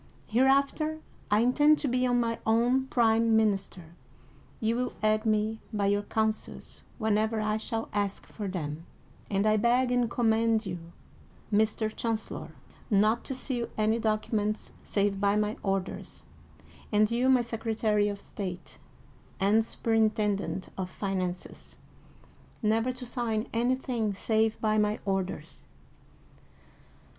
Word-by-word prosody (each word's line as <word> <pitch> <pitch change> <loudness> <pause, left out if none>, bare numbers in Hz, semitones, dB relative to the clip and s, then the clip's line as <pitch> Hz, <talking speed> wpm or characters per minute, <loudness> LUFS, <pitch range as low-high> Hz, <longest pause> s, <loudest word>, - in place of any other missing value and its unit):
Hereafter 275 +6 +2 0.3
I 210 +1 +4
in 245 +2 +3
tend 300 +2 +5
to 295 - -1
be 250 0 +1
my 240 -2 +1
own 245 +4 +2
prime 225 -2 +3
minister. 195 -6 -1 0.7
You 225 +1 +1
will 250 +1 -1
aid 215 +1 +2
me 215 +1 +1
by 205 -2 0
your 205 - +1
counsels 220 +1 -2 0.2
whenever 220 0 +1
I 215 0 0
shall 225 +1 -3
ask 205 -1 -2
for 210 -2 -6
them, 160 -3 -5 0.4
and 200 0 +1
I 215 0 +4
beg 245 +3 +3
and 245 -2 +2
command 225 -1 +2
you, 180 -2 -4 0.7
Mr. 215 +1 +1
Chancellor, 225 -2 -3 0.4
not 215 +2 +3
to 265 - -3
seal 245 -2 -3
any 220 +1 +2
docu 215 -1 -1
ments 215 0 -1
save 200 -1 0
by 200 0 +3
my 210 0 0
orders, 195 -1 -3 0.7
and 210 +1 +3
you, 245 +3 +2
my 255 -2 +5
Secretary 220 -2 0
of 200 -1 -3
State, 180 -7 -7 0.6
and 205 +4 +4
Superintendent 215 -4 0
of 185 -1 -2
Finances, 185 -2 -4 0.9
never 225 +3 +2
to 250 0 -8
sign 235 -2 -2
anything 240 -3 0
save 220 +2 +1
by 215 -1 +2
my 210 +1 +1
orders." 190 -5 -3
220 Hz, 130 wpm, -29 LUFS, 205-235 Hz, 0.9 s, tend